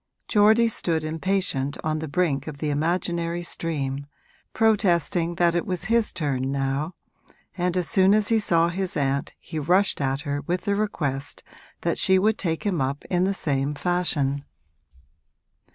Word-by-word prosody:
Geordie 220 +2 +5
stood 165 -7 -1
impatient 155 -4 -1
on 155 0 -1
the 160 - -4
brink 145 -3 0
of 150 -2 -6
the 150 +1 -2
imaginary 170 +2 -1
stream, 140 -5 -3 0.4
protesting 175 -6 +2
that 170 0 +3
it 175 - 0
was 180 -2 -3
his 230 -2 +3
turn 135 -4 -2
now, 140 +4 -2 0.6
and 180 0 0
as 180 - 0
soon 195 -1 +4
as 215 -1 +3
he 225 -1 +4
saw 170 -5 +2
his 185 +1 -3
aunt 140 -1 -1
he 160 -2 -6
rushed 180 +4 +2
at 135 0 0
her 145 -1 -3
with 175 +3 -2
the 200 - 0
request 145 -10 -3 0.4
that - - -1
she 190 - +4
would 215 +3 +2
take 165 +3 -2
him 185 -7 0
up 135 +2 -2
in 180 0 +2
the 195 - +1
same 140 -3 -1
fashion. 145 -5 0
170 Hz, 160 wpm, -24 LUFS, 145-185 Hz, 0.6 s, Geordie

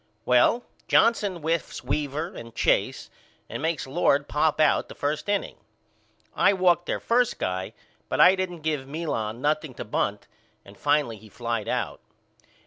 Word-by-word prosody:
Well, 125 - +4 0.2
Johnson 215 -4 +3
whiffs 165 0 -2
Weaver 150 +3 -2
and 115 0 -10
Chase - - +1 0.4
and - - -6
makes 160 -1 -1
Lord 140 0 +2
pop 150 +1 +1
out 155 -2 +3
the - - -10
first 150 +6 -2
inning. 205 -1 -1 0.8
I - - +4
walked 180 -2 +2
their - - -1
first 240 0 +1
guy 95 0 -3 0.4
but - - -1
I 185 - +8
didn't 185 -3 -3
give 150 -4 -2
Milan 125 -7 -3
nothing 150 -2 0
to - - -6
bunt 105 -1 -2 0.4
and 100 - -14
finally 145 -1 +1
he 110 +1 -15
flied 115 0 -3
out. - - -2
150 Hz, 150 wpm, -26 LUFS, 120-175 Hz, 0.8 s, I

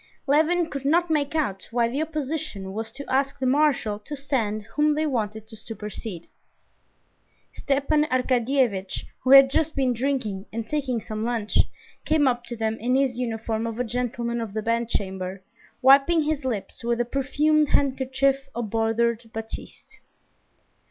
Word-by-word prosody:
Levin 320 +4 +3
could 280 -4 -6
not 330 +4 +2
make 295 -1 0
out 205 -12 -1
why 235 0 +2
the 265 +6 -2
opposition 305 -10 -4
was 225 +2 -4
to 280 +1 -8
ask 270 +1 0
the 260 - -2
marshal 255 -6 +2
to 255 +8 -7
stand 230 -7 -1
whom 300 0 +3
they 310 +1 0
wanted 220 -6 -2
to 220 - -11
supersede. 210 -4 -7 1.3
Stepan 285 +2 +1
Arkadyevitch, 250 -6 0
who 255 - -3
had 275 0 +10
just 315 +2 0
been 260 -2 +2
drinking 235 -6 -2
and 225 0 -4
taking 265 -5 -1
some 215 0 -4
lunch, 230 -3 0 0.4
came 310 -3 +3
up 245 -1 +1
to 240 0 -5
them 220 0 -1
in 250 +3 +1
his 265 -3 +1
uniform 225 -1 -2
of 230 -1 -5
a 250 - 0
gentleman 235 0 -2
of 220 -3 -5
the 215 - -2
bedchamber, 195 -5 -2 0.4
wiping 275 +5 +6
his 300 -1 -1
lips 230 -5 -4
with 235 0 0
a 240 - +1
perfumed 290 +4 +2
handkerchief 270 0 +1
of 230 -4 -3
bordered 225 +1 0
batiste. 225 0 -9
250 Hz, 155 wpm, -25 LUFS, 225-280 Hz, 1.3 s, had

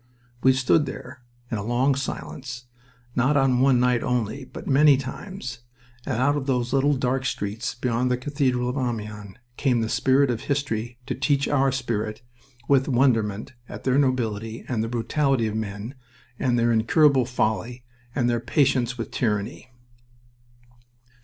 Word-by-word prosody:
We 130 - +5
stood 135 +4 +2
there 125 - -8 0.3
in 110 - -1
a - - -4
long 125 +5 +2
silence, 130 -2 -5 0.5
not 135 +4 +3
on 135 -2 +3
one 130 -1 +4
night 125 -1 +2
only, 125 +2 -2
but - - -10
many 145 0 +5
times, 130 -1 -6 0.5
and - - -1
out 140 +4 +2
of 145 -2 -3
those 125 -2 0
little 140 +1 +3
dark 130 0 0
streets 110 -4 -3
below 120 0 0
the 125 0 +1
cathedral 130 -2 0
of 125 +3 -2
Amiens 105 -5 -4 0.2
came 125 -4 +2
the 110 - -1
spirit 135 +2 +3
of 115 - -3
history 120 -5 -2
to 135 - -2
teach 140 +1 +1
our 135 -1 +2
spirit 115 -4 -3 0.4
with 135 -2 +3
wonderment 115 -5 +1 0.2
at - - -8
the 130 -1 +2
nobility 115 -5 -1
and 115 -4 -1
the 115 - -3
brutality 125 +1 +1
of 110 - -2
men, 105 +2 -4 0.5
and 125 -3 +1
their 120 0 +3
incurable 130 +4 +4
folly, 120 0 -1 0.3
and 125 -4 +1
their 120 -1 +1
patience 130 -1 +1
with 115 - -5
tyranny. 105 +1 -2
125 Hz, 155 wpm, -24 LUFS, 115-135 Hz, 0.5 s, We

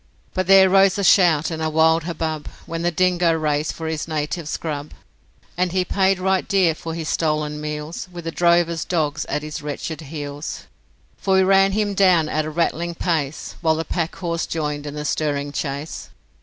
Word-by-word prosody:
But 185 -2 -1
there 195 0 +8
rose 195 +1 +4
a 200 - -1
shout 175 -5 +4
and 160 -1 -4
a 160 - 0
wild 160 +1 +3
hubbub 160 -3 -3 0.2
When 165 0 -4
the 175 - +2
dingo 175 -1 +2
raced 150 -1 0
for 160 - -7
his 160 -1 -3
native 155 +1 -3
scrub, 150 -2 -4 0.6
And 180 0 0
he 185 -1 +1
paid 190 0 +2
right 190 0 0
dear 190 -5 +3
for 165 +1 -6
his 165 -2 -4
stolen 150 -2 -1
meals 150 +3 -5
With 175 -1 -8
the 165 - -2
drover's 170 -1 +2
dogs 155 -3 -1
at 150 - -3
his 155 0 -6
wretched 150 +2 -5
heels. 145 0 -6 0.5
For 190 -1 +1
we 190 - +5
ran 195 +1 +4
him 205 -1 0
down 180 -5 +4
at 155 0 0
a - - -3
rattling 170 +1 -1
pace, 160 -5 -2
While 160 -2 +3
the 160 +1 -3
packhorse 170 0 -2
joined 150 -2 -3
in 145 - -6
the 150 0 -4
stirring 145 -1 -1
chase. 145 +1 -5
160 Hz, 185 wpm, -21 LUFS, 150-180 Hz, 0.6 s, there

